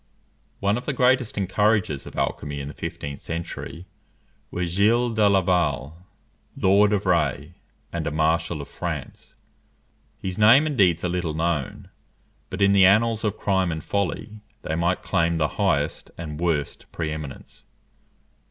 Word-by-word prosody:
One 100 +4 +1
of 125 - -14
the 150 - 0
greatest 125 -3 +2
encouragers 100 -4 +1
of - - -10
alchymy 75 -1 -2
in 70 - -5
the - - -8
fifteenth 70 0 -6
century 85 +1 -6 0.6
was 90 -1 -3
Gilles 115 +6 +3
de 105 -2 +4
Laval, 85 -4 0 0.5
Lord 100 +2 +4
of 105 -1 0
Rays 85 -3 +1 0.4
and - - -2
a - - -1
Marshal 80 0 0
of - - -12
France. - - -6 0.8
His 95 +1 -5
name 115 +8 +7
and 150 -2 -2
deeds 90 -7 +3
are - - 0
little 85 -3 -2
known; 80 -4 -2 0.6
but 95 +2 -1
in 100 - +5
the 100 -1 +5
annals 110 +2 +3
of 105 -1 -1
crime 95 -3 +1
and 80 -1 -5
folly, 100 +2 -3 0.2
they - - -3
might 85 +3 0
claim 85 -2 +1
the 75 -2 +1
highest 75 +1 0
and 75 -3 -6
worst 80 -5 -2
pre 80 -2 -3
eminence. 75 -3 -8
90 Hz, 150 wpm, -24 LUFS, 80-105 Hz, 0.8 s, name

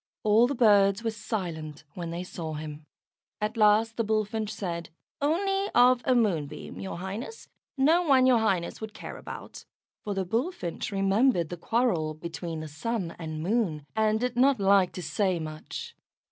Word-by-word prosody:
All 215 +3 +5
the 280 - -2
birds 205 -2 +4
were 225 - 0
silent 165 -9 -5
when 170 -2 -5
they 170 +2 -4
saw 165 -3 -6
him. 150 0 -7 0.5
At 210 +2 -2
last 220 +1 +4
the 230 - +2
Bullfinch 215 0 -1
said, 170 -5 -4 0.3
"Only 390 +7 +1
of 250 0 +6
a 255 - +3
Moonbeam, 180 -12 -1
your 190 -3 -5
Highness. 205 - -6 0.3
No 310 +6 +4
one 270 -6 +4
your 255 -2 +5
Highness 195 -5 0
would 220 -1 -7
care - - -8
about," - - -9 0.4
for 205 -1 -3
the 190 -1 -1
Bullfinch 225 - -2
remembered 195 - +2
the 175 - -4
quarrel 175 -5 0
between 165 0 -5
the 155 - -6
Sun 170 +4 -3
and 155 -2 -5
Moon, 180 -7 0
and 220 0 +2
did 250 0 -1
not 265 0 +4
like 195 -2 +4
to 180 - -6
say 190 +2 0
much. 155 -1 -7
205 Hz, 165 wpm, -28 LUFS, 170-235 Hz, 0.5 s, of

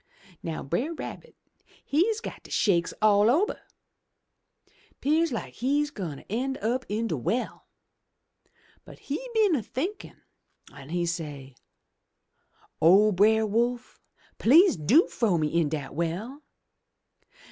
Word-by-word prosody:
Now 165 -2 -5
Brer 245 - -2
Rabbit - - -8 0.5
he's 415 +10 +1
got - - -8
de - - -15
shakes 175 -6 +1
all 210 0 +5
ober! 340 - +1 1.4
'Pears 315 +3 +1
like 235 - -5
he's 290 +4 0
gwine 175 - -6
ter - - -13
en' 265 +6 -2
up 245 +5 -2
in 215 +3 -1
de 190 - -1
well. 215 - -3 1.2
But - - -14
he 480 - -5
been 425 -5 +4
a 280 - +1
thinkin' 320 - -6 0.5
an' 140 -1 -12
he 175 +1 -1
say, 150 -5 -5 1.3
'O 195 +6 +6
Brer 220 +3 +3
Wolf, 240 +3 -1 0.4
please 335 - +6
do 205 - +4
frow 210 -7 0
me 155 -1 0
into 160 -2 +1
de 140 -2 -8
well 180 - -4
220 Hz, 125 wpm, -26 LUFS, 170-280 Hz, 1.4 s, O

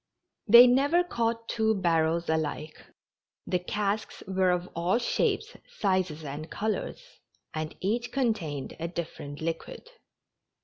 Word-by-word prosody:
They 235 +3 +10
never 285 +8 +4
caught 230 -7 -2
two 220 -1 +1
barrels 170 -2 +1
alike; 155 -1 -2 0.6
the 180 - 0
casks 205 +3 -2
were 190 -1 +2
of 180 0 0
all 175 +6 +2
shapes, 240 - 0 0.2
sizes 185 -6 0
and 150 +2 -6
colors, 220 - -4 0.3
and 155 0 -4
each 235 +6 -1
contained 195 - -1
a 165 - -2
different 160 -4 -6
liquid. 165 - -5
185 Hz, 120 wpm, -28 LUFS, 160-230 Hz, 0.6 s, They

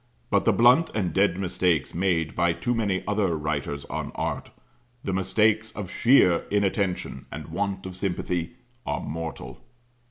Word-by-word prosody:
But - - +3
the - - +5
blunt 125 +8 +5
and 95 -5 0
dead 95 -1 +3
mistakes 90 -4 0
made 85 -3 0
by 85 0 +2
too 120 +8 -1
many 100 -5 0
other 100 -5 +1
writers 75 -2 -3
on - - -4
art - - -3 0.5
the 95 - -2
mistakes 105 +4 +2
of 100 -4 -6
sheer 115 -9 +4
inattention, 100 -2 -1
and - - -7
want 100 -1 -2
of 95 -1 -6
sympathy 90 0 -2 0.3
are - - -2
mortal. 80 +1 -6
95 Hz, 150 wpm, -26 LUFS, 85-105 Hz, 0.5 s, the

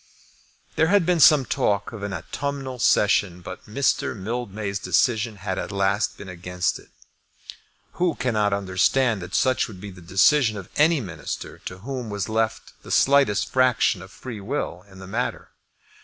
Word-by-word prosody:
There 160 +1 +4
had 200 -1 +3
been 175 -1 +2
some 145 -2 +7
talk 100 +1 0
of 110 -3 -8
an 100 0 -4
autumnal 130 - -4
session, 100 -4 +2
but 90 +1 -9
Mr. 120 0 0
Mildmay's 105 -1 -4
decision 110 +5 +1
had 95 -1 -4
at - - -5
last 100 +1 0
been - - -10
against 90 0 -2
it. - - -19 1.0
Who 175 -3 0
cannot 110 -5 0
understand 100 +4 +1
that 90 +1 -6
such 130 -2 +2
would 100 -6 -11
be 100 +1 -8
the 90 -1 -13
decision 110 - +3
of 95 -3 -8
any 155 0 +4
Minister 85 -7 -6
to 90 - -6
whom 130 -4 -4
was 100 -2 -3
left 110 0 -2
the - - -13
slightest 135 -7 +3
fraction 125 -6 +3
of 95 - -11
free 115 -2 -8
will 100 -6 -4
in 95 - -15
the 95 - -10
matter? 115 +6 -3
105 Hz, 165 wpm, -24 LUFS, 95-130 Hz, 1.0 s, some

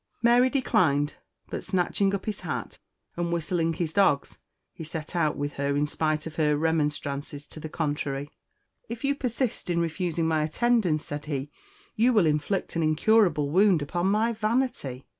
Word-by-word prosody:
Mary 240 +2 +5
declined; 155 - +1 0.3
but - - -4
snatching 195 +1 +1
up 195 - -6
his 215 - -3
hat, - - -5 0.4
and 170 0 -2
whistling 165 0 0
his 160 -1 -3
dogs, 190 -9 +2 0.3
he 165 - -8
set 155 +1 -6
out 155 -3 +1
with 145 0 -3
her 140 0 0
in 145 - +2
spite 155 +1 -1
of 160 - -8
her 150 -2 +2
remonstrances 150 -2 -1
to 155 - -12
the 155 - -6
contrary. 145 -2 -3 0.6
"If 235 +2 -6
you 280 0 +2
persist 250 -6 -2
in 170 -1 +1
refusing 170 0 -1
my 160 -1 +2
attendance," 175 -1 +1
said 145 0 -6
he, 145 -1 -3 0.4
"you 240 +3 +3
will 210 -6 +4
inflict 155 +6 -1
an 165 - +1
incurable 155 -2 +3
wound 185 -3 +4
upon 175 +5 -1
my 220 +4 +2
vanity. 215 - -1
165 Hz, 165 wpm, -27 LUFS, 150-200 Hz, 0.6 s, Mary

